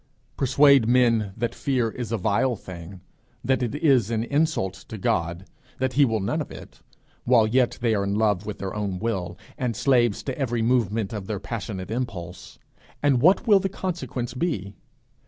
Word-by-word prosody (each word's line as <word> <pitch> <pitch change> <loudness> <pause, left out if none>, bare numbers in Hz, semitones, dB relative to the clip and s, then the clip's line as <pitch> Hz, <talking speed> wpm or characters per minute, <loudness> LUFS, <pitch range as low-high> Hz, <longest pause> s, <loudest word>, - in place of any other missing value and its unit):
Persuade 140 -2 +5
men 115 -4 +3
that 120 0 -2
fear 125 -5 0
is 120 -3 -6
a 115 - 0
vile 115 +6 +1
thing, 90 -1 -10 0.4
that 130 +1 +2
it 125 +2 -2
is 135 -8 +3
an 115 -1 0
insult 145 - 0
to 95 +3 -10
God, 85 -1 -1 0.3
that 130 0 -1
he 145 0 +5
will 110 -3 0
none 95 - -1
of - - -6
it - - -12 0.4
while 120 -3 +4
yet 120 +2 +1
they 115 -2 +2
are 100 -2 +1
in 100 +1 -1
love 105 -3 +1
with 105 - -4
their 95 -1 -5
own 100 -3 -3
will, 90 -5 -3 0.2
and 125 -3 -1
slaves 120 -6 +2
to 135 - -3
every 120 -5 -1
movement 115 -3 +1
of 100 -2 -6
passionate 100 -4 -5
impulse, 90 -8 -5 0.5
and 135 -4 +3
what 185 - +4
will 210 -4 +6
the 195 0 -2
consequence 170 -11 -4
be? 120 - -2
115 Hz, 175 wpm, -24 LUFS, 100-130 Hz, 0.5 s, will